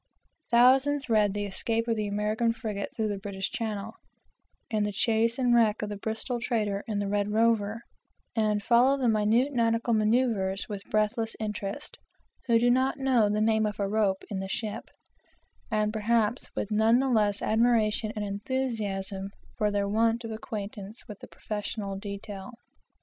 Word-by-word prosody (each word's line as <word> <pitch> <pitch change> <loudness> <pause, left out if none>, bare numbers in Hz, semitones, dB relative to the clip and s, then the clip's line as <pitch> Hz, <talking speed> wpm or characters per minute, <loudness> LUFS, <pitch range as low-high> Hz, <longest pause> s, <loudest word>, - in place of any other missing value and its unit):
Thousands 265 +4 +4
read 210 -2 +3
the 205 0 -1
escape 225 +4 -1
of 230 - +1
the 215 -1 -2
American 215 +3 0
frigate 215 -4 -4
through 220 -2 -1
the 200 -1 -3
British 195 0 -4
channel, 220 -1 -4 0.8
and 215 -2 +1
the 210 - -1
chase 225 +3 +1
and 250 -2 +2
wreck 220 -3 +3
of 210 - -3
the 205 - -4
Bristol 220 +4 -3
trader 210 -4 -1
in 215 -2 -2
the 200 0 -1
Red 205 0 0
Rover, 225 0 +1 0.5
and 210 -2 +1
follow 250 +5 +4
the 260 -3 0
minute 225 +5 +2
nautical 230 -1 +1
manoeuvres 215 -3 +1
with 205 -2 -5
breathless 220 +2 0
interest, 210 -2 -5 0.5
who 235 -1 +5
do 240 +1 +4
not 260 +2 +2
know 255 -6 +3
the 210 +1 0
name 220 0 +3
of 210 -1 -5
a 200 - 0
rope 200 -2 +1
in 195 - -2
the 190 0 -5
ship; 215 +1 -4 0.8
and 215 -1 0
perhaps 225 +2 +1
with 210 - -3
none 220 +2 +4
the 270 +1 +1
less 210 -5 +2
admiration 220 -1 +2
and 210 -1 -2
enthusiasm 200 -3 -3 0.3
for 210 -3 +1
their 200 -1 0
want 225 +3 +1
of 225 - -5
acquaintance 210 0 -6
with 210 -3 -9
the - - -11
professional 210 -1 -5
detail. 200 +1 -7
215 Hz, 165 wpm, -28 LUFS, 205-230 Hz, 0.8 s, who